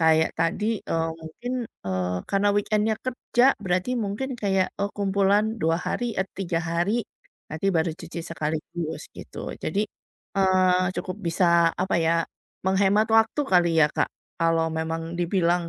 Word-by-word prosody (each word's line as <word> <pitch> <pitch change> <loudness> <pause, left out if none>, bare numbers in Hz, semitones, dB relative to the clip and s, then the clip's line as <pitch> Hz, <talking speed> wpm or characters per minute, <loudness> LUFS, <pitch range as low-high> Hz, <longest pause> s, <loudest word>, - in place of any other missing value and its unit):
Kayak 160 0 +4
tadi, 210 +7 0
eee, 165 0 -1
mungkin, 200 +11 -6 0.3
eee, 90 -1 -1
karena 200 +1 +3
weekend-nya 215 +1 +1
kerja 250 -1 +1 0.2
berarti 185 +3 0
mungkin 220 +6 -2
kayak, 195 -3 +1
oh, 200 - +1
kumpulan 200 +2 +2
2 165 +1 +3
hari, 240 +3 -2
eee, 190 - +1
3 175 -4 -1
hari, 175 +7 0 0.5
nanti 160 +5 -2
baru 165 -3 +2
cuci 170 0 -7
sekaligus 160 0 -4
gitu. - - -7
Jadi, 200 +7 0 0.5
eee, 185 -1 +4
cukup 185 - -4
bisa 170 0 +4
apa 185 +1 0
ya, 165 0 +2 0.4
menghemat 200 +3 +3
waktu 225 +6 +4
kali 175 -2 +4
ya 150 - +7
Kak, - - +1 0.3
kalau 165 -1 +3
memang 165 +1 -3
dibilang 175 -1 +1
180 Hz, 140 wpm, -25 LUFS, 165-200 Hz, 0.5 s, ya